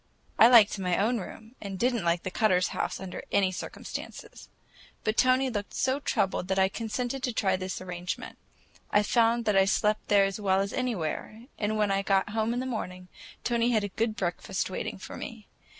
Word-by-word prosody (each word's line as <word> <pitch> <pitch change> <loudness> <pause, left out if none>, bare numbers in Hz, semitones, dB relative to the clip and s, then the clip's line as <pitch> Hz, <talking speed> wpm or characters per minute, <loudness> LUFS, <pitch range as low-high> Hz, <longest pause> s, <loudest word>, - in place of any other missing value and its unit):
I 225 - +10
liked 225 -4 +6
my 180 -2 0
own 230 +4 +1
room, 220 +4 -10
and 200 -2 -6
I - - -5
did 245 +5 +2
n't 230 -5 -2
like 170 0 +1
the 185 - -4
Cutters' 185 -3 +2
house - - -3
under 190 -1 -6
any 195 -2 +3
circumstances; 185 - -8 0.5
but 215 - 0
Tony 255 +2 +4
looked 205 -3 -4
so 260 +2 +1
troubled 190 -9 0
that 190 - 0
I 190 0 +4
consented 240 +5 -3
to 255 - -1
try 195 -4 +1
this 185 0 -4
arrangement. 180 -1 -6 0.5
I 205 - +3
found 235 +1 +2
that 210 - +2
I 195 0 +5
slept 210 +2 +1
there 200 -1 +5
as 195 +1 -3
well 190 -1 +2
as 195 0 -2
anywhere, 220 -2 -3 0.2
and 215 0 0
when 210 -2 +2
I 195 0 +2
got 195 0 +1
home 220 +1 0
in 245 - -1
the 255 - -3
morning, 185 -7 -5 0.3
Tony 235 0 +1
had 215 -2 +2
a 205 - -2
good 220 +3 -1
breakfast 185 0 -2
waiting - - -4
for - - -9
me. 225 -2 -8
205 Hz, 205 wpm, -28 LUFS, 190-230 Hz, 0.5 s, I